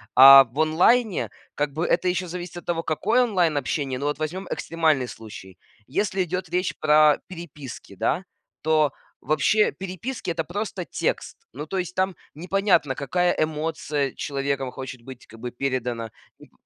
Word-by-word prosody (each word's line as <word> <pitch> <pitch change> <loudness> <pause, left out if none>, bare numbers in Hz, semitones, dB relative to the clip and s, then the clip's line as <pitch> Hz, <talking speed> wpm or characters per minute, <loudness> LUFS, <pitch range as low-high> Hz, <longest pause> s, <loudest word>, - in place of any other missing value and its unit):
А 135 +1 +11
в 130 +3 -10
онлайне, 180 +8 +3 0.3
как 145 -1 -1
бы, 160 +4 -2
это 180 +1 +2
ещё 180 0 -1
зависит 175 0 -7
от - - -9
того, 170 -1 -1
какое 225 +10 +2
онлайн-общение. 150 - 0
Ну 140 - -3
вот 145 0 -1
возьмём 180 +5 -4
экстремальный 160 -6 +1
случай. 105 -5 -11 0.3
Если 190 +5 0
идёт 180 0 -4
речь 180 +1 -1
про 150 -1 +5
переписки, 150 - -9
да, 185 - -1 0.4
то 155 -2 +3 0.3
вообще 155 +9 +3
переписки- 195 +3 -5
это 165 -1 -2
просто 195 +2 -4
текст. - - -3 0.2
Ну 150 +4 -7
то 190 - -3
есть 180 -1 -3
там 190 0 0 0.2
непонятно, 175 -3 +1
какая 175 +5 0
эмоция 155 -3 -1
человеком 140 -2 -2
хочет 130 -1 -8
быть, 130 0 -11
как 115 - -14
бы, 125 +1 -5
передана. 125 -3 -2 0.3
М. - - -16
155 Hz, 155 wpm, -24 LUFS, 135-180 Hz, 0.4 s, А